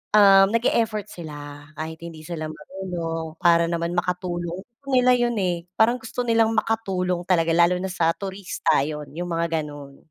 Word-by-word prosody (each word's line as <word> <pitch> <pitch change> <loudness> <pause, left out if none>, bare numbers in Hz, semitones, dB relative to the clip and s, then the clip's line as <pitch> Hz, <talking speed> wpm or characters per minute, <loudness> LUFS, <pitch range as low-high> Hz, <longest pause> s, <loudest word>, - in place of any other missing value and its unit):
ah, 195 -2 +8
nag-e-effort 225 -2 +1
sila 145 -4 -9
kahit 160 +1 -5
hindi 160 -2 -9
sila 155 -1 -5
marunong 165 -1 -5
para 170 -1 +5
naman 170 0 -1
makatulong. 175 0 -2 0.2
Gusto 280 - -27
nila 250 0 +5
yun 240 -1 +1
eh, 175 -2 -1
parang 235 +3 +3
gusto 245 +2 -4
nilang 225 -1 +2
makatulong 185 -5 0
talaga 170 -3 +3
lalo 175 +1 +5
na 190 +1 -3
sa 165 -2 +2
turista 195 -1 -1
yun, 150 -2 -6
yung 175 +2 -4
mga 165 0 -1
ganun. 145 -2 -10
175 Hz, 160 wpm, -24 LUFS, 165-200 Hz, 0.2 s, ah